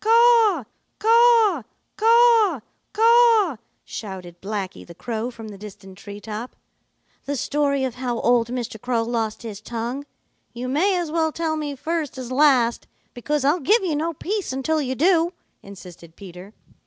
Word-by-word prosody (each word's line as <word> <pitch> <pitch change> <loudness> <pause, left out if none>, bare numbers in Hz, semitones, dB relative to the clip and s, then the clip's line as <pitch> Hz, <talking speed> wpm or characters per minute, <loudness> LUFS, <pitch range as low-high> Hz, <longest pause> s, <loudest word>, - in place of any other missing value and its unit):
"Caw, 455 - +4 0.3
caw, 455 - +4 0.3
caw, 455 - +4 0.3
caw!" 455 - +4 0.3
shouted 185 -4 -8
Blacky 195 -2 -5
the 170 - -13
Crow 230 +3 -4
from 225 -3 -10
the 205 - -10
distant 195 -2 -11
tree 200 +1 -10
top. 220 +3 -7 0.7
"The 285 - -2
story 280 0 0
of 260 -2 -2
how 245 -1 -3
old 240 -1 +2
Mr. 240 -3 -5
Crow 240 -2 0
lost 225 -2 -3
his 215 -3 -7
tongue. 235 +5 -5 0.5
You 245 +1 -5
may 360 +9 +1
as 340 -3 -3
well 320 -1 +1
tell 320 0 -2
me 295 -2 -4
first 315 -1 -3
as 255 -1 -7
last, 255 -4 +3 0.3
because 285 +3 -2
I'll 300 +6 +3
give 415 - +2
you 335 -5 -1
no 320 +3 -1
peace 395 +3 -3
until 285 +4 -1
you 260 -2 -3
do," 340 +3 +2 0.3
insisted 180 -4 -13
Peter. 190 +2 -12
265 Hz, 155 wpm, -22 LUFS, 225-345 Hz, 0.7 s, Caw